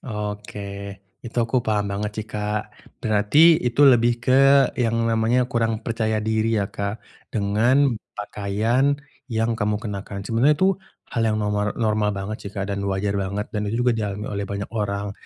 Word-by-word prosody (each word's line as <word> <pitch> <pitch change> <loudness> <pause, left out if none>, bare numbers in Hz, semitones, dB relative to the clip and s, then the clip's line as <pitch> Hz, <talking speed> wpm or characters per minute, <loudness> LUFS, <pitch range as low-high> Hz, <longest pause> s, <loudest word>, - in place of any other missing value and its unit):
Oke, 105 -3 -6 0.2
itu 120 0 -10
aku 115 +3 -1
paham 105 -1 +1
banget 105 +1 -2
sih, 110 - -4
Kak. 105 0 -1 0.4
Berarti 105 +4 +1 0.2
itu 125 +3 -1
lebih 120 0 +4
ke 130 - +2 0.5
yang 115 -1 +1
namanya 115 +2 +2
kurang 115 -1 0
percaya 110 -1 -1
diri 110 +1 +1
ya, 100 - 0
Kak, 100 +1 -3 0.4
dengan 120 +7 +3 0.2
pakaian 110 +7 0 0.3
yang 115 +1 0
kamu 105 -1 0
kenakan. 100 -2 -5
Sebenarnya 125 +7 +3
itu 190 +1 +4 0.4
hal 115 - 0
yang 110 - +1
nomor 105 0 -1
normal 105 -2 +1
banget 100 +2 -4
sih, - - -12
Kak, 100 -1 -2
dan 100 - -3
wajar 100 +1 -1
banget 100 +2 -3
dan 105 -1 -2
itu 120 +3 -1
juga 125 - +4
dialami 105 -1 -3
oleh 100 0 -2
banyak 100 0 -4
orang. 100 -1 -2
105 Hz, 165 wpm, -23 LUFS, 100-115 Hz, 0.5 s, lebih